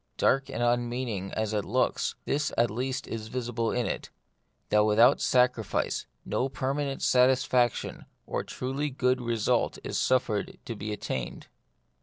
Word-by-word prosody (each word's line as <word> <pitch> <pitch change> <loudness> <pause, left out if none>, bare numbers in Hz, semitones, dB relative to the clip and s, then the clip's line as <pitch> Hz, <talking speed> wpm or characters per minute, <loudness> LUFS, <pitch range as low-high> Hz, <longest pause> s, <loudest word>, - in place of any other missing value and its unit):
Dark 135 +1 +2
and 120 - -2
unmeaning 120 -4 -1
as 110 0 -1
it 105 -1 0
looks, - - 0
this 145 0 0
at 120 -1 +3
least 125 +3 -2
is 110 -1 -5
visible 120 -1 -2
in 125 -1 0
it, - - -3 0.6
that 105 0 +4
without 115 +5 +5
sacrifice 125 -4 +1 0.2
no 130 - 0
permanent 135 +1 -2
satisfaction 125 -1 +2 0.2
or - - -2
truly 135 +3 -3
good 125 -1 +1
result 115 -3 +1
is - - -2
suffered 115 -5 +1
to 115 - -4
be 105 +1 -5
attained. 65 -11 -4
120 Hz, 140 wpm, -28 LUFS, 110-130 Hz, 0.6 s, without